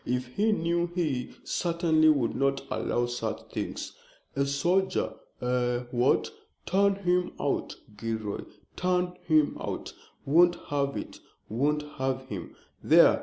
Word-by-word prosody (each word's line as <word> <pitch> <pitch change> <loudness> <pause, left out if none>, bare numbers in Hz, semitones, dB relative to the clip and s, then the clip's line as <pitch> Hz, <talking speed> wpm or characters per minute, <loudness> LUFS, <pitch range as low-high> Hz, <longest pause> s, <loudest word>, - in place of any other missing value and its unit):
If 125 0 -2
he 210 - +1
knew 170 -3 +1
he 150 -8 -1
certainly 165 -2 +2
would 135 -7 +2
not 135 0 +1
allow 120 - 0
such 110 -2 -4
things. 105 - -4 0.4
A 140 0 +1
soldier 175 +7 +1 0.3
eh 125 -1 0
what? 120 0 +2 0.3
Turn 200 +1 +3
him 180 -2 +1
out, - - -1 0.2
Gilroy, 110 -2 -3 0.3
turn 180 0 +1
him 155 -2 +3
out! - - -5 0.3
Won't 175 +5 +5
have 140 -1 0
it, - - -7 0.3
won't 145 +6 +1 0.2
have 130 0 0
him! 95 -5 -6 0.3
There! - - +6
140 Hz, 125 wpm, -28 LUFS, 125-175 Hz, 0.4 s, There